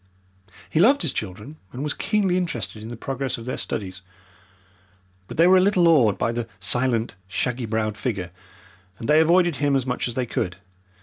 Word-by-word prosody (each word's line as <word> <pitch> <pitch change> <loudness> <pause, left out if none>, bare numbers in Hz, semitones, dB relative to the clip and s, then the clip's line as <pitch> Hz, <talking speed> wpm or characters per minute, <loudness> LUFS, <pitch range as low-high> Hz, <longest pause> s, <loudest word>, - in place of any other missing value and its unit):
He 125 - -1
loved 250 +6 +5
his 160 - 0
children, 105 +9 -6
and 130 +3 -5
was 150 - -1
keenly 200 -4 0
interested 145 -11 -2
in 110 - -8
the 120 - -7
progress 135 +2 -3
of 115 - -9
their 125 - -3
studies, 95 -3 -4 1.3
but - - -9
they 165 - +6
were 185 +1 +7
a - - +5
little 185 -3 +4
awed 125 -12 +4
by 115 - 0
the 120 -1 -3
silent, 120 +2 0
shaggy 125 +4 -2
browed 110 -1 -1
figure, 100 -9 -3 0.7
and 115 - -6
they 150 +1 +5
avoided 170 0 +4
him 145 -1 +1
as 130 -2 +1
much 125 -1 -2
as 120 - -6
they 130 - 0
could. 90 -6 -3
125 Hz, 190 wpm, -23 LUFS, 110-160 Hz, 1.3 s, were